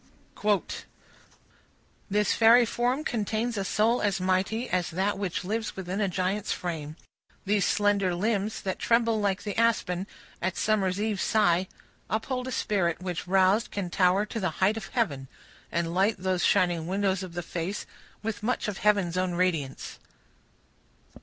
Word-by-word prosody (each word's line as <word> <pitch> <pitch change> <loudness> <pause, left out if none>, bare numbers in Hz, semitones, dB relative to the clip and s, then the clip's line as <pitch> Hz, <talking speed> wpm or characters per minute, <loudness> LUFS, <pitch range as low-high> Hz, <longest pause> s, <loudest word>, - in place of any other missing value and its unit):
CHAPTER 210 -1 +2 0.2
XII. - - -14 1.2
This 210 +1 +2
fairy 235 +2 +6
form 245 +5 0
contains 225 -1 -1
a 200 - -1
soul 220 +5 +2
as 200 -2 +1
mighty, 190 +6 0
As 180 -4 0
that 195 +4 -1
which 195 -4 -2
lives 220 +4 -3
within 190 +2 -3
a 200 - +2
giant's 185 +2 -1
frame; 155 -4 -4 0.5
These 200 -1 +2
slender 200 -3 +2
limbs, 210 +2 -1
that 190 -1 -3
tremble 230 -2 +2
like 200 -1 0
the 205 -2 -4
aspen 200 -5 +1 0.3
At 185 +1 -1
summer 210 -3 +2
evening's 205 +2 -1
sigh, 185 -4 +2 0.4
uphold 250 +5 -2
a - - -4
spirit, 190 -8 0
Which, 180 -2 -4
roused, 190 +4 +3
can 190 -4 -4
tower 185 +3 +3
to 225 - -5
the 185 -4 0
height 195 +3 +3
of 220 -3 -6
heaven, 150 - -1 0.4
And 170 0 -1
light 195 +4 +2
those 185 -1 -1
shining 175 -4 +2
windows 190 0 0
of 185 -3 -7
the 175 0 -4
face 175 +5 -4 0.4
With 220 -1 -3
much 240 +2 -1
of 205 -2 -4
heaven's 200 -4 +2
own 185 -1 0
radiance. 165 -7 -1
195 Hz, 160 wpm, -27 LUFS, 180-215 Hz, 1.2 s, fairy